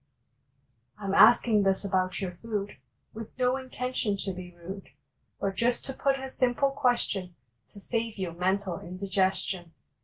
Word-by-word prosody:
I 210 Hz, -, -8 dB
m 195 Hz, -, -1 dB
asking 225 Hz, 0 st, +7 dB
this 195 Hz, 0 st, +1 dB
about 185 Hz, 0 st, 0 dB
your 185 Hz, -2 st, -2 dB
food 205 Hz, +2 st, -4 dB, 0.4 s
With 225 Hz, +1 st, -9 dB
no 250 Hz, 0 st, +2 dB
intention 255 Hz, -5 st, -2 dB
to 195 Hz, -, -2 dB
be 180 Hz, 0 st, -8 dB
rude, 185 Hz, +3 st, -8 dB, 0.5 s
But 195 Hz, -, -1 dB
just 235 Hz, +5 st, +1 dB
to 270 Hz, -, -4 dB
put 270 Hz, +1 st, +1 dB
a 265 Hz, 0 st, -5 dB
simple 255 Hz, +2 st, +2 dB
question 240 Hz, -9 st, 0 dB, 0.4 s
To 200 Hz, -, -11 dB
save 230 Hz, +1 st, -2 dB
you 185 Hz, -3 st, -2 dB
mental 185 Hz, +1 st, 0 dB
indigestion. 185 Hz, -1 st, -1 dB
200 Hz, 150 wpm, -28 LUFS, 185-240 Hz, 0.5 s, asking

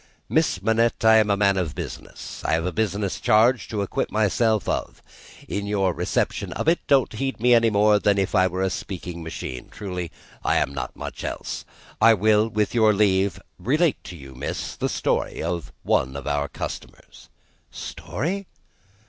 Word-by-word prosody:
"Miss 90 Hz, -, +1 dB
Manette, 115 Hz, +1 st, +2 dB
I 110 Hz, 0 st, +8 dB
am 110 Hz, -1 st, +3 dB
a 100 Hz, -, +3 dB
man 100 Hz, -1 st, +3 dB
of 80 Hz, -7 st, -2 dB
business. -, -, -7 dB
I -, -, 0 dB
have 80 Hz, +1 st, +1 dB
a 90 Hz, -, 0 dB
business 100 Hz, -1 st, -1 dB
charge 115 Hz, +3 st, +3 dB
to 105 Hz, -2 st, -2 dB
acquit 100 Hz, -, -2 dB
myself 110 Hz, 0 st, +2 dB
of. -, -, -3 dB, 0.4 s
In 100 Hz, 0 st, -3 dB
your 95 Hz, -3 st, +1 dB
reception -, -, -1 dB
of -, -, -3 dB
it, 170 Hz, +1 st, +4 dB
don't 135 Hz, -5 st, +3 dB
heed 135 Hz, +3 st, -3 dB
me 120 Hz, +2 st, +4 dB
any 115 Hz, -1 st, +5 dB
more 105 Hz, 0 st, +4 dB
than 100 Hz, -1 st, +2 dB
if 95 Hz, -1 st, 0 dB
I 95 Hz, -, +4 dB
was 95 Hz, +1 st, -1 dB
a -, -, +1 dB
speaking 90 Hz, -3 st, -6 dB
machine 65 Hz, -6 st, -6 dB
truly, 90 Hz, -4 st, -5 dB, 0.3 s
I -, -, +2 dB
am 70 Hz, -, +1 dB
not 65 Hz, -3 st, -5 dB
much -, -, -7 dB
else. -, -, -5 dB, 0.4 s
I 115 Hz, 0 st, +7 dB
will, 105 Hz, +2 st, +3 dB
with 105 Hz, -1 st, 0 dB
your 110 Hz, -2 st, +5 dB
leave, 100 Hz, -2 st, +2 dB, 0.2 s
relate 150 Hz, +4 st, +1 dB
to 90 Hz, -, -8 dB
you, 70 Hz, -3 st, -11 dB
miss, 65 Hz, -, -4 dB
the -, -, -1 dB
story -, -, -1 dB
of 85 Hz, 0 st, -3 dB
one 65 Hz, +1 st, +1 dB
of 70 Hz, -, -7 dB
our 70 Hz, 0 st, 0 dB
customers." -, -, -8 dB, 0.4 s
"Story!" 190 Hz, +7 st, -4 dB
100 Hz, 180 wpm, -24 LUFS, 90-110 Hz, 0.4 s, I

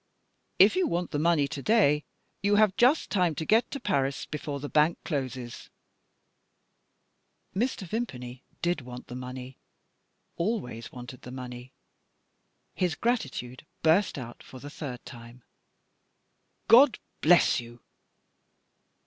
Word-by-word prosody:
"If -, -, +7 dB
you 370 Hz, -2 st, +2 dB
want 175 Hz, -, -2 dB
the 145 Hz, -, -1 dB
money 155 Hz, -3 st, +3 dB
to 140 Hz, -1 st, -6 dB
day, 150 Hz, -, +3 dB, 0.4 s
you 200 Hz, +1 st, +3 dB
have 210 Hz, -2 st, +4 dB
just 260 Hz, +6 st, +3 dB
time 180 Hz, -5 st, +2 dB
to 160 Hz, -, -3 dB
get 225 Hz, +6 st, +3 dB
to 280 Hz, -, -5 dB
Paris 140 Hz, -, 0 dB
before 145 Hz, -1 st, -5 dB
the 145 Hz, -, -5 dB
bank 155 Hz, +3 st, +3 dB
closes." 130 Hz, -6 st, -4 dB, 1.9 s
Mr. 225 Hz, -1 st, -1 dB
Vimpany 130 Hz, -, -5 dB, 0.2 s
did 175 Hz, -3 st, +1 dB
want 125 Hz, 0 st, -9 dB
the 120 Hz, -, -6 dB
money 125 Hz, 0 st, -8 dB, 0.8 s
always 170 Hz, -, -3 dB
wanted 125 Hz, 0 st, -10 dB
the -, -, -10 dB
money; 125 Hz, 0 st, -8 dB, 1.0 s
his 180 Hz, -4 st, 0 dB
gratitude 140 Hz, -, -2 dB, 0.2 s
burst 165 Hz, +4 st, +3 dB
out 120 Hz, -3 st, -8 dB
for 130 Hz, -, -12 dB
the 145 Hz, +3 st, -9 dB
third 130 Hz, -5 st, -7 dB
time: 120 Hz, 0 st, -12 dB, 1.2 s
"God 240 Hz, +2 st, +7 dB, 0.2 s
bless 175 Hz, -2 st, +5 dB
you!" 120 Hz, 0 st, -11 dB
145 Hz, 125 wpm, -28 LUFS, 125-195 Hz, 1.9 s, If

